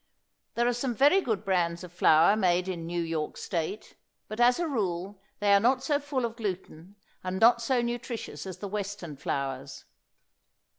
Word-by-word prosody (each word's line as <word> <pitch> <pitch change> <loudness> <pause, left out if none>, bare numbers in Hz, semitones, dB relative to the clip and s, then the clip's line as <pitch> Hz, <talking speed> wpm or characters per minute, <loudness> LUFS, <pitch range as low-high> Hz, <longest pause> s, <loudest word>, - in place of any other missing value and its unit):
There 240 - +2
are 245 - +2
some 245 0 -2
very 290 - +5
good 220 - -2
brands 175 -2 0
of 175 -1 -10
flour 165 +2 +5
made 180 -3 +2
in 170 -3 -4
New 170 0 -2
York 160 -2 -3
State, 175 +5 -4 0.3
but 215 +2 -7
as 245 +1 +5
a 345 -1 -1
rule 195 - -3 0.2
they 205 -1 +3
are 200 - +7
not 255 +4 +2
so 285 +1 +1
full 280 -4 -2
of 230 -1 -5
gluten 190 -3 -6 0.3
and 185 +1 -3
not 235 +1 +6
so 245 +1 +1
nutritious 240 -3 -5
as 185 -2 -7
the 200 - -6
Western 200 -5 -5
flours. 135 0 -4
200 Hz, 180 wpm, -28 LUFS, 175-240 Hz, 0.3 s, are